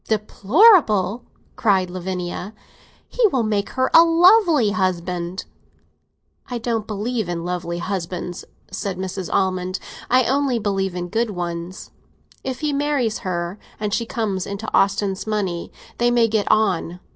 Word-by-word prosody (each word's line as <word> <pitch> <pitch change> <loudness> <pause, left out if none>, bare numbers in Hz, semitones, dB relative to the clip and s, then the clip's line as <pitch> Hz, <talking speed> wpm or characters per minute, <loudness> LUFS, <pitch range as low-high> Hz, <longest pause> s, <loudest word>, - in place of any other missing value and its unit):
"Deplorable?" 215 - +3 0.3
cried 190 -5 +2
Lavinia. 185 +2 -5 0.5
"He - - +3
will 260 - 0
make 210 -2 -1
her 260 0 +1
a 330 - +9
lovely 335 - +5
husband!" 180 -2 -2 1.0
"I 245 - -4
don't 225 -2 -2
believe 215 -1 -2
in 170 -1 -3
lovely 175 -1 -3
husbands," 180 -1 -4 0.3
said 190 0 -4
Mrs. 185 -1 -5
Almond; 185 -1 0 0.3
"I 255 +1 +5
only 270 0 +1
believe 195 -3 -1
in 175 0 -3
good 230 +3 0
ones. 175 -1 -5 0.5
If 260 -1 -4
he 300 -1 0
marries 280 -6 0
her, 175 +1 -4 0.2
and 210 -1 -2
she 230 0 -1
comes 205 -6 -2
into 200 +2 -5
Austin's 195 0 +1
money, 195 -5 -2 0.3
they 240 0 +3
may 240 -1 +3
get 215 -2 0
on. 180 -5 +1
200 Hz, 135 wpm, -21 LUFS, 185-235 Hz, 1.0 s, a